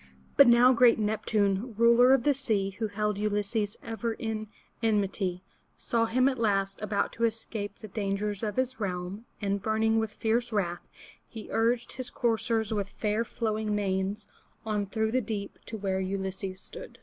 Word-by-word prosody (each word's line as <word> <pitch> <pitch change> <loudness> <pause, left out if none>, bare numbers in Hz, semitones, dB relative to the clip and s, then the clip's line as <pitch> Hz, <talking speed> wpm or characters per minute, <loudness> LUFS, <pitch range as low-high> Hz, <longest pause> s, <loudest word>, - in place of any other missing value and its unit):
But 280 - +8
now 240 +2 +7
great 240 -1 +6
Nep'tune, 210 0 0
ruler 235 +2 +6
of 250 - -1
the 290 - +4
sea, 220 -8 -1
who 220 - 0
held 210 0 -1
Ulysses 210 0 -1
ever 225 0 -3
in 220 -1 -4 0.3
enmity, 195 -4 0 0.3
saw 230 -1 +1
him 255 +3 +3
at 260 -3 0
last 195 -3 0
about 210 -1 -1
to 230 - -4
escape 220 -2 -2
the 215 - -9
dangers 200 0 -2
of 210 -2 -2
his 260 0 -1
realm, 190 +2 -4 0.2
and, 200 0 0
burning 220 +1 +2
with 220 -1 -1
fierce 235 +2 0
wrath, 175 -5 -2 0.4
he 220 -2 -9
urged 230 +1 +1
his 255 -1 -4
coursers 225 -2 0
with 200 -2 -2
fair 215 +2 -1
flowing 215 -2 -2
manes 195 +1 -1 0.4
on 210 -2 -1
through 220 +2 -1
the 255 +2 +2
deep 205 -2 -5
to 225 - -5
where 190 -2 -1
Ulysses 190 0 -3
stood. - - -10
215 Hz, 165 wpm, -29 LUFS, 200-230 Hz, 0.4 s, But